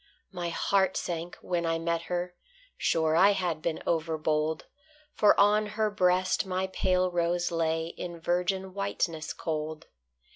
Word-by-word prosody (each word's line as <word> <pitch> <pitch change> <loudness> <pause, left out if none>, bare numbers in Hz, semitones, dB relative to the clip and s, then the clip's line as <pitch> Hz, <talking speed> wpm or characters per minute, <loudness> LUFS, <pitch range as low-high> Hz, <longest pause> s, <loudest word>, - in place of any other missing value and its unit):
My 175 -3 -3
heart 190 +2 +1
sank 170 0 -4
when 175 -1 -1
I 165 0 0
met 165 0 -1
her: 180 0 -2 0.4
sure 160 -1 +1
I 200 +4 +6
had 175 -5 -2
been 165 -1 -2
overbold, 155 -1 0 0.5
For 210 - +4
on 210 +1 +4
her 215 -1 +2
breast 185 -2 +2
my 185 0 -1
pale 185 -1 +1
rose 175 0 0
lay 165 0 0
In 170 -1 -6
virgin 180 +3 -1
whiteness 175 -5 -2
cold. 155 -1 -4
175 Hz, 140 wpm, -28 LUFS, 165-185 Hz, 0.5 s, I